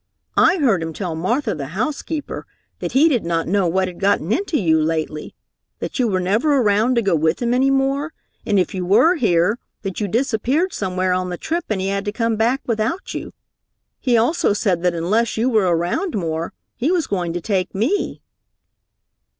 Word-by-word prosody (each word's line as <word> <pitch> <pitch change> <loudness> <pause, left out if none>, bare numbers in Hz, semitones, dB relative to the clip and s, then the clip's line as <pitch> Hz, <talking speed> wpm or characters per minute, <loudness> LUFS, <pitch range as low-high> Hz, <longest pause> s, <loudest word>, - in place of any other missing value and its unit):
"I - - +5
heard 235 - +2
him 165 0 -4
tell 180 -1 -4
Martha, 215 - -1
the 145 +3 -6
housekeeper, 295 +4 -3 0.3
that - - -4
he 285 +5 +5
did 260 -8 +1
not 165 -1 -1
know 195 0 +2
what 185 +2 +1
had 180 -1 -9
gotten 195 -3 +1
into 360 - 0
you 160 -5 +3
lately, 155 -1 -2 0.4
that - - -5
you 250 - +3
were 190 -3 0
never 220 +11 +2
around 220 +1 +3
to 235 - +2
go 195 -4 +2
with 160 +1 +1
him 240 -1 0
any 265 +2 +3
more, 275 +3 +1 0.3
and 205 - +1
if 185 +3 +1
you 185 -1 -3
were 205 - +5
here, 205 - +2 0.2
that 195 -3 -4
you 205 - 0
disappeared 260 - 0
somewhere 185 -1 -1
on 185 0 -1
the 175 - -4
trip 335 - -2
and 215 -3 0
he 190 - -1
had 200 +1 -2
to 205 - -1
come 230 +1 0
back 235 +5 +1
without 230 - -2
you. - - -5 0.7
He 245 -3 +2
also 235 0 +2
said 195 -4 0
that 180 -1 +1
unless 210 +8 0
you 240 +4 +1
were 215 -5 +3
around 175 - 0
more, 165 -3 -2 0.2
he 280 +8 0
was 355 -4 +1
going 180 -4 -2
to 175 - -2
take 190 -1 -1
me." 245 - -1
205 Hz, 200 wpm, -20 LUFS, 180-255 Hz, 0.7 s, I